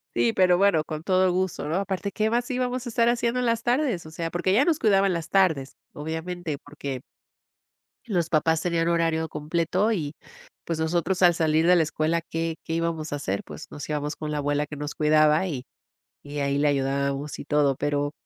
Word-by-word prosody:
Sí, 120 -1 +2
pero 180 -1 +4
bueno, 195 -5 +3
con 155 0 -6
todo 185 0 +3
gusto, 185 -4 -1
¿no?, 155 - -1
aparte, 195 +1 -2
¿qué 215 +1 0
más 240 +1 0
íbamos 255 0 -2
a - - -4
estar 235 0 +2
haciendo 240 +1 0
en 250 - 0
las 230 -1 +1
tardes? 245 - 0
O - - -9
sea, 165 +1 -4
porque 175 +2 -1
ella 235 +9 +4
nos 330 -3 +2
cuidaba 200 -3 +4
en 190 - +1
las 170 -2 -4
tardes, 160 -9 +2 0.2
obviamente, 160 +1 -4
porque 140 -3 -7 1.0
los 175 -8 -1
papás 160 0 +2
tenían 170 -1 0
horario 165 -1 +1
completo 170 +7 0
y, 155 -8 -2 0.5
pues, 165 -2 -2
nosotros 170 +3 0
al 175 -1 +7
salir 160 0 +2
de 180 - +7
la 170 - +4
escuela, 155 +2 0
¿qué 165 0 -3
qué 165 - -4
íbamos 165 -1 -2
a - - -1
hacer? 100 -8 -3
Pues 75 0 -10
nos 145 - -7
íbamos 150 0 -2
con 155 -1 -5
la 150 - -2
abuela, 145 +1 0
que 150 - -7
nos 145 0 -5
cuidaba 155 +2 +4
y 135 -7 -5 0.6
y 145 0 -7
ahí 140 -1 0
le 145 +1 +3
ayudábamos 140 +1 -1
y - - -7
todo. 145 -2 +2
Pero, 145 +1 -1
165 Hz, 205 wpm, -25 LUFS, 150-185 Hz, 1.0 s, al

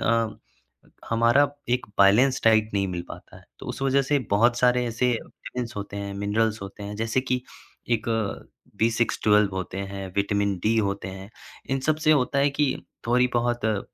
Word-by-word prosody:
अ, 115 -1 +1 0.7
हमारा 120 +5 +4 0.2
एक 125 +1 0
balance 120 +7 +5
diet 110 -1 +4
नहीं 100 -1 +1
मिल 90 -1 -4
पाता - - -11
है। - - -20
तो - - -10
उस - - -5
वजह 135 0 +3
से 145 +2 +1
बहुत 120 +4 +4
सारे 125 0 +3
ऐसे 120 +2 0
विटामिन्स 120 0 -6
होते 100 0 -6
हैं, 100 0 -5
मिनरल्स 105 +1 0
होते 100 +1 -9
हैं 105 +1 -6
जैसे 115 +3 0
कि 125 -1 -2 0.5
एक 115 -1 0 0.7
बी-सिक्स, 115 +1 +1
ट्वेल्व 105 -1 +4
होते 95 +1 -4
हैं, 100 0 -5
विटामिन-डी 100 +1 +1
होते 100 -2 -1
हैं। 95 +2 -9 0.4
इन 135 0 0
सब 155 - +4
से 155 - +7
होता 140 -1 +1
है 140 +1 +3
कि 140 -1 +1 0.3
थोड़ी-बहुत 120 -1 +1
अ, 105 -2 0
115 Hz, 170 wpm, -25 LUFS, 100-125 Hz, 0.7 s, से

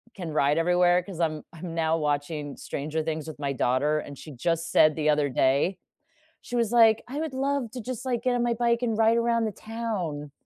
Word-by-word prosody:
can 175 -5 -6
ride 150 0 +2
everywhere, 175 +1 +3
because 180 -2 -9
I'm 155 -3 -1
I'm 165 0 -7
now 165 0 +1
watching 145 -1 -2
Stranger 155 +3 -3
Things 160 -1 -3
with 155 - -8
my 140 -1 -2
daughter, 140 +5 +1
and 140 -2 -8
she 155 - -10
just 165 +5 -2
said 155 -1 +5
the 155 -1 0
other 150 -1 +2
day, 140 +9 +2 0.6
she 245 - -6
was 235 -2 +1
like, 225 -2 +5
"I 280 +4 -5
would 315 -4 -3
love 270 -3 -1
to 250 - -6
just, 255 +1 -6
like, 240 -2 -1
get 250 -1 +1
on 240 - +1
my 240 -1 +1
bike 235 +1 +1
and 225 -3 0
ride 225 +1 +4
around 230 -1 +1
the 215 - -2
town." 190 -11 -5
170 Hz, 220 wpm, -26 LUFS, 150-230 Hz, 0.6 s, said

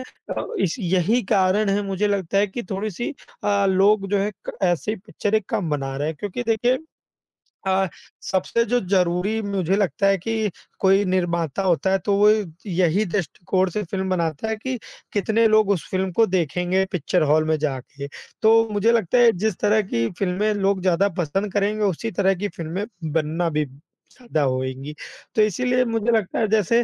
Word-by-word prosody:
अ, 255 - -7
इस 170 - 0
यही 190 +5 +1
कारण 195 +2 +3
है 200 +1 +1
मुझे 195 +2 0
लगता 195 -1 0
है 205 - +3
कि 235 +5 -6
थोड़ी-सी 210 - -3 0.3
अ, 200 -1 +2
लोग 195 +1 +3
जो 205 - +2
हैं 205 +2 -1 0.2
क - - -5
ऐसे 175 +2 0
ही - - -4
पिक्चरें 215 +1 0
कम 200 -9 -1
बना 135 -2 -2
रहे 145 +2 -1
हैं 160 - -4
क्योंकि 205 +4 -3
देखिए 240 +3 +2 0.9
अ, 190 0 +2 0.3
सबसे 195 +5 0
जो 245 +3 +1
ज़रूरी 185 +3 +1
मुझे 195 -3 0
लगता 195 0 +1
है 195 0 +4
कि 220 +2 -1 0.3
कोई 195 +1 +4
निर्माता 175 -2 0
होता 185 +1 +2
है 195 - +4
तो 200 -1 +2
वो 210 +1 +6 0.4
यही 185 +3 +2
दृष्टिकोण 185 0 -1
से 210 +4 -3
फ़िल्म 190 +2 -3
बनाता 170 +3 -1
है 220 - 0
कि 255 +3 -3 0.4
कितने 220 +3 +2
लोग 215 -1 +4
उस 180 - -1
फ़िल्म 190 0 -1
को 225 +6 +4
देखेंगे 180 +1 0
पिक्चर 180 0 0
हॉल 155 0 +4
में 155 - +2
जाके। 140 -1 -4 0.3
तो 225 +1 +5
मुझे 210 +3 +3
लगता 230 0 +2
है 240 -1 +7
जिस 220 -5 +1
तरह 215 +1 +3
की 115 0 +1
फ़िल्में 200 +3 +1
लोग 195 -2 0
ज़्यादा 190 +2 +2
पसंद 190 +5 -1
करेंगे 210 +1 0
उसी 205 +4 -1
तरह 195 +1 +2
की 200 +3 -2
फ़िल्में 170 +5 -3 0.3
बनना 165 +2 0
भी 150 -1 0 0.5
ज़्यादा 240 -12 -3
होएँगी। 130 +2 -2 0.4
तो 220 - +4
इसीलिए 250 +5 +2
मुझे 230 0 0
लगता 220 -5 0
है 220 - +2
जैसे 220 +3 +3
195 Hz, 180 wpm, -23 LUFS, 175-215 Hz, 0.9 s, है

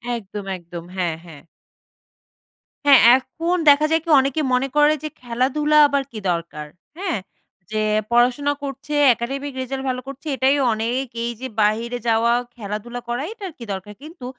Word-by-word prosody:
একদম, 205 -2 -7
একদম। 170 -1 -9
হ্যাঁ, 175 -3 0
হ্যাঁ। 155 -4 -12 1.4
হ্যাঁ 280 -3 +8 0.2
এখন 330 +7 -2
দেখা 290 +2 +6
যায় 320 0 +3
কি? 335 - -9
অনেকে 275 +3 0
মনে 250 +2 +2
করে 295 +1 +5
যে 310 - -3
খেলাধুলা 260 +5 +1
আবার 280 -1 0
কী 220 - -6
দরকার? 170 -3 -4 0.3
হ্যাঁ? 360 - -2 0.5
যে 215 0 0 0.3
পড়াশোনা 250 +4 +3
করছে, 275 +2 -6 0.2
academic 275 +4 -4
রেজাল্ট 265 +1 -4
ভালো 255 0 -2
করছে 275 +3 -9
এটাই 265 +2 +3 0.2
অনেক। 235 +5 -1 0.2
এই 235 - -1
যে 260 - -3
বাহিরে 230 +4 +1
যাওয়া, 230 +1 +3 0.2
খেলাধুলা 225 +2 -6
করা 240 +2 -1
এটার 400 -5 -7
কী 240 - -9
দরকার? 190 +2 -7
কিন্তু 310 -4 -10
255 Hz, 155 wpm, -21 LUFS, 220-285 Hz, 1.4 s, হ্যাঁ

